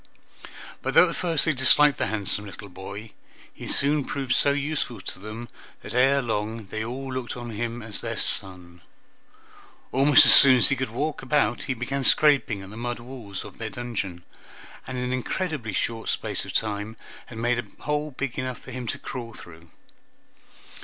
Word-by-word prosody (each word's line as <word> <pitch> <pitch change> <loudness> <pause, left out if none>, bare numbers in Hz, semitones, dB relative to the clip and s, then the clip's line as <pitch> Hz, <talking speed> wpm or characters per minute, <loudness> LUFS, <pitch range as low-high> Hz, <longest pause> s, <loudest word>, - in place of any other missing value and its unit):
But - - -3
though - - +7
at - - -5
first 165 -4 +1
they 155 - +2
disliked 140 +2 +5
the - - +1
handsome 105 -1 -1
little 100 +1 -10
boy, 100 +4 -9 0.4
he - - -9
soon 145 +1 +2
proved 135 -2 -2
so - - +3
useful 145 -4 -2
to 95 - -6
them, 110 +4 -7 0.4
that - - -8
ere 135 +2 +4
long 110 -1 -3
they 110 +3 -4
all 130 +3 -5
looked 130 -1 -4
on 120 -1 -6
him 115 +2 -4
as 110 -1 -4
their - - -4
son. 90 -2 +1 1.1
Almost 135 +1 +6
as - - +9
soon 130 -2 +9
as 125 - +5
he 140 - +2
could 130 -3 -3
walk 145 +7 -3
about 120 -6 +1
he 130 - 0
began 135 +3 -3
scraping 135 -10 +3
at 95 - -11
the 110 - -9
mud 120 +1 -3
wall 120 -5 -10
of - - -12
their 115 -1 -3
dungeon, 100 -6 -5 0.6
and 130 - -5
in 125 - -2
an 125 0 -2
incredibly 130 - -3
short 115 +4 -2
space - - -2
of - - -8
time 105 +1 -2 0.3
had 115 - -10
made 120 +1 +1
a 105 -4 -10
hole 150 0 -1
big 135 -2 -4
enough 130 -1 -3
for 130 - -12
him 125 -1 -6
to - - -3
crawl 115 -3 -7
through. 80 -1 -14
120 Hz, 185 wpm, -25 LUFS, 110-135 Hz, 1.1 s, as